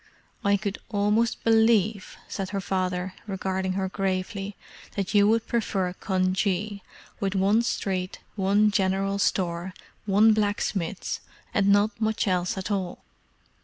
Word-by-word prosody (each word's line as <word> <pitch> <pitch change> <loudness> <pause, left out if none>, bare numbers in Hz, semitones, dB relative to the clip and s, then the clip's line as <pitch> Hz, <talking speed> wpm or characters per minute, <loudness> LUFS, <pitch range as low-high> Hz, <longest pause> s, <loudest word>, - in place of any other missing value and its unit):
"I 200 0 +4
could 200 0 -4
almost 210 +2 +1
believe," 220 -3 +3
said 195 -3 -4
her 200 - -2
father, 185 -1 -2
regarding 190 -1 -2
her 190 0 -1
gravely, 195 +1 -2 0.4
"that 195 0 -2
you 205 -1 +6
would 225 +1 +2
prefer 195 -6 -1
Cunjee, 190 +2 0 0.4
with 195 -1 -1
one 200 +4 +4
street, 190 -5 -2 0.2
one 205 +1 +3
general 195 0 +1
store, 180 -1 0 0.3
one 210 +3 +6
blacksmith's, 205 -3 -1 0.3
and 200 -1 +2
not 205 +3 +3
much 220 0 +1
else 180 0 0
at 190 +2 -4
all." 190 -3 -2
195 Hz, 130 wpm, -26 LUFS, 190-210 Hz, 0.4 s, you